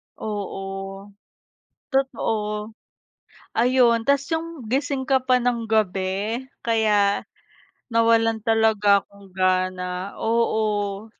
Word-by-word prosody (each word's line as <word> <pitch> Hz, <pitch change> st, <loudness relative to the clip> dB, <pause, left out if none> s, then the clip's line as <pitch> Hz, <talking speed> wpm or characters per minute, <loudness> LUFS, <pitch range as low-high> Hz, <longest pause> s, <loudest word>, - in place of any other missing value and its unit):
Oo. 195 Hz, -1 st, -6 dB, 0.8 s
Totoo. 220 Hz, -5 st, -1 dB, 0.8 s
Ayun, 240 Hz, -1 st, +4 dB
tapos 280 Hz, 0 st, +2 dB
'yong 325 Hz, 0 st, -1 dB, 0.2 s
gising 275 Hz, 0 st, 0 dB
ka 270 Hz, -1 st, +4 dB
pa 255 Hz, -1 st, +3 dB
ng 235 Hz, -2 st, 0 dB
gabi, 200 Hz, +2 st, 0 dB, 0.2 s
kaya, 210 Hz, -3 st, +2 dB, 0.7 s
nawalan 225 Hz, 0 st, +3 dB
talaga 215 Hz, -3 st, +3 dB
akong 200 Hz, -1 st, -18 dB
gana 185 Hz, 0 st, -1 dB
oo. 215 Hz, -2 st, 0 dB
220 Hz, 85 wpm, -23 LUFS, 200-235 Hz, 0.8 s, Ayun